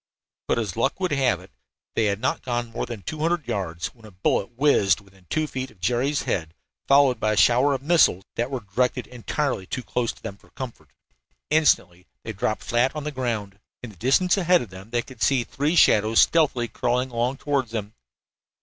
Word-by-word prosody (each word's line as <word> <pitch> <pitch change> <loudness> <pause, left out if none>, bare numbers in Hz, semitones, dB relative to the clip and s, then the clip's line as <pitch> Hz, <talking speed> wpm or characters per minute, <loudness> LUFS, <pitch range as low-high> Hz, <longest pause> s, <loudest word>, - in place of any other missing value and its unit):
But - - +1
as 105 -6 -2
luck 135 +8 0
would 185 -2 -1
have 135 -4 +2
it 95 - -16 0.4
they 110 - +1
had 100 -1 0
not 130 - -1
gone 120 -2 -3
more 115 - -3
than 115 -5 -7
two 155 - -5
hundred 165 0 0
yards 85 -4 -3
when 115 - -22
a 110 - -11
bullet 95 +1 0
whizzed 115 -10 +3
within 95 -3 -22
two 155 0 0
feet 130 -3 -5
of 100 - -22
Jerry's 125 - 0
head, 80 -10 -2 0.3
followed 140 -3 +5
by 110 0 +1
a - - -3
shower 125 +6 +4
of 135 - -6
missiles 155 - +4
that 120 +2 -2
were 130 -3 -3
directed 125 +5 -1
entirely 125 -3 -3
too 130 - -4
close 120 -1 -1
to - - -22
them 100 - -6
for - - -23
comfort. 130 -3 -8 0.6
Instantly 95 - +2 0.2
they 110 - -5
dropped 110 +2 -2
flat 120 +4 +1
on 150 - -4
the 150 - -3
ground. 110 -7 -3 0.2
In 120 - -7
the - - -17
distance 135 - +2
ahead 180 -3 +3
of 110 - -12
them 95 +3 -11
they 120 0 0
could 130 -4 -14
see 135 -3 +3
three 145 +7 -1
shadows 110 -7 +5
stealthily 145 -7 +3
crawling 125 +2 -1
along 120 +3 -1
toward 140 -3 -1
them. 110 -2 -5
120 Hz, 205 wpm, -24 LUFS, 105-140 Hz, 0.6 s, followed